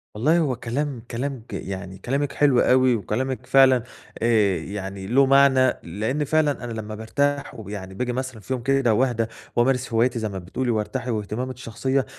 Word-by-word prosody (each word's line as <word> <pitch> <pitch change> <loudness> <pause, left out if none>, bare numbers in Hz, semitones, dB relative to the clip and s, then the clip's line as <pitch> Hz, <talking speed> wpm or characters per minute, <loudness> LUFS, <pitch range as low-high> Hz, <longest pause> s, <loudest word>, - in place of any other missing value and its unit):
والله 150 +11 +3
هو 145 -6 +1
كلام 130 +2 -3
كلام 130 +2 -3
ج - - -8
يعني 95 -1 -6
كلامِك 140 +5 -1
حلو 140 -4 +4
أوي، 130 -1 +4
وكلامِك 130 +5 -3
فعلا 130 -1 +5 0.4
آآ 110 -5 +3
يعني 95 -1 -6
له 135 +6 +4
معنى، 135 -1 +5
لإن 110 - -2
فعلًا 150 -2 +1
أنا 120 - -5
لمّا 110 -1 -5
بارتاح 140 +6 -1
ويعني 100 -4 -7
باجي 125 +5 -2
مثلًا 130 -3 -4
في 130 - -4
يوم 125 -2 -4
كده 135 -3 +2
واهدا، 120 -1 +1 0.3
وامارس 125 0 +1
هواياتي 120 +2 +2
زي 110 -1 -2
ما 95 -1 -5
بتقولي 120 +8 -2
وارتاح 115 +3 -2
واهتماماتي 115 +3 -3
الشخصية، 130 +3 -1
125 Hz, 170 wpm, -23 LUFS, 110-135 Hz, 0.4 s, فعلا